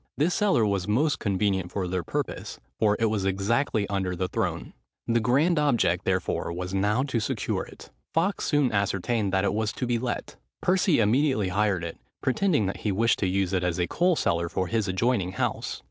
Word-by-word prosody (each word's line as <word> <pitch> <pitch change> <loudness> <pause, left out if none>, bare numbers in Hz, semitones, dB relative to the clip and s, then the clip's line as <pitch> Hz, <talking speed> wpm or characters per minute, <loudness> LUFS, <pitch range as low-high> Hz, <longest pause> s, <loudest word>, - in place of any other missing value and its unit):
This 160 +5 +2
cellar 195 - +3
was 100 -2 -1
most 140 +8 +1
convenient 95 -3 0
for 95 -3 -2
their 90 0 -1
purpose: - - -4 0.2
for 105 -1 +3
it 115 - +2
was 105 -3 0
exactly 100 +3 0
under 95 -2 -2
the 90 +1 -1
throne. - - -3 0.3
The 115 0 +2
grand 140 +9 +2
object, 145 -5 +2
therefore, - - -1
was 90 +2 -5
now 105 +6 +1
to 130 -4 -1
secure 105 - -2
it. - - -14 0.2
Fawkes 175 +4 0
soon 145 -4 +2
ascertained 100 +1 0
that 95 0 +1
it 100 - +1
was 110 0 0
to 125 - -3
be 120 -1 0
let. 120 0 -4 0.2
Percy 185 -4 +2
immediately 115 -1 +2
hired 100 -2 +1
it, 85 -1 -6 0.2
pretending 145 - +1
that 95 - -3
he 105 - -2
wished 115 +4 +2
to 95 - +1
use 95 0 0
it 90 -1 +1
as 90 -2 0
a 90 - +1
coal 175 - +2
cellar 85 - 0
for 95 - -1
his 110 +2 -1
adjoining 95 -1 0
house. - - -2
105 Hz, 195 wpm, -26 LUFS, 95-125 Hz, 0.3 s, cellar